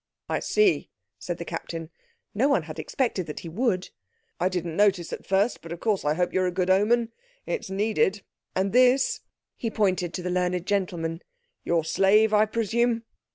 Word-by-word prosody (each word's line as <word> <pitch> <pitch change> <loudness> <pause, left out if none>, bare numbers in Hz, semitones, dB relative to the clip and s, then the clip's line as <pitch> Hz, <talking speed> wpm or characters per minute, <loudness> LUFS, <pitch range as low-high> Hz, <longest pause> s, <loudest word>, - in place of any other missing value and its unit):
"I - - -1
see," 425 -3 +2 0.3
said - - -4
the - - -6
Captain; 165 -1 -6 0.4
no 255 +7 +2
one 280 - +2
had - - -8
expected 230 - -1
that 150 - -6
he 170 - -7
would. 190 0 -1 0.5
"I 180 - +2
didn't 175 -3 -3
notice 195 -4 +2
at - - -7
first, 195 +4 +1
but 165 - -10
of 170 - -5
course 210 -2 0
I 150 +1 +1
hope 180 +1 0
you're 185 -1 +2
a - - 0
good 185 +1 +1
omen. 225 +4 +3 0.3
It's 480 - -3
needed. 205 0 +1 0.3
And 190 +2 0
this," 255 +2 +4 0.4
he 230 - -2
pointed 185 -5 0
to 180 - -4
the 180 - -2
learned 180 -1 0
gentleman, 175 -4 -1 0.4
"your 165 -2 +1
slave, 205 +5 +4
I 215 +1 +5
presume?" 230 +1 0
190 Hz, 180 wpm, -26 LUFS, 180-225 Hz, 0.5 s, I